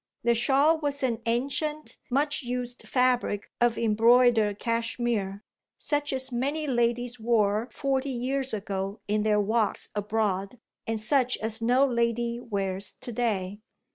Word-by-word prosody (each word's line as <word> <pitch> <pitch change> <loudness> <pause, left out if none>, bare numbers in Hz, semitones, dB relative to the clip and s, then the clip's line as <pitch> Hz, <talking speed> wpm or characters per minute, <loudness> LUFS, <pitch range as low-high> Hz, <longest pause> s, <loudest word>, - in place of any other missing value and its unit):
The 235 0 +4
shawl 275 +7 +3
was 285 -2 -3
an 235 -3 0
ancient 280 +6 -2
much 290 +4 +1
used 245 -1 -4
fabric 250 -5 +1
of 240 -1 +3
embroidered 230 -1 +4
cashmere, 230 -3 -1 0.3
such 290 -1 -1
as 260 0 -1
many 280 +6 -1
ladies 240 -1 0
wore 220 0 +1
forty 275 -1 -1
years 265 +2 -2
ago 195 -1 -3
in 210 +1 +1
their 210 0 +2
walks 215 +1 0
abroad 205 0 -1 0.3
and 225 -1 -1
such 255 +3 +2
as 220 +1 -3
no 250 +4 +4
lady 235 -1 0
wears 195 -4 -3
to 255 -1 -5
day. 205 -4 -1
235 Hz, 135 wpm, -27 LUFS, 215-255 Hz, 0.3 s, The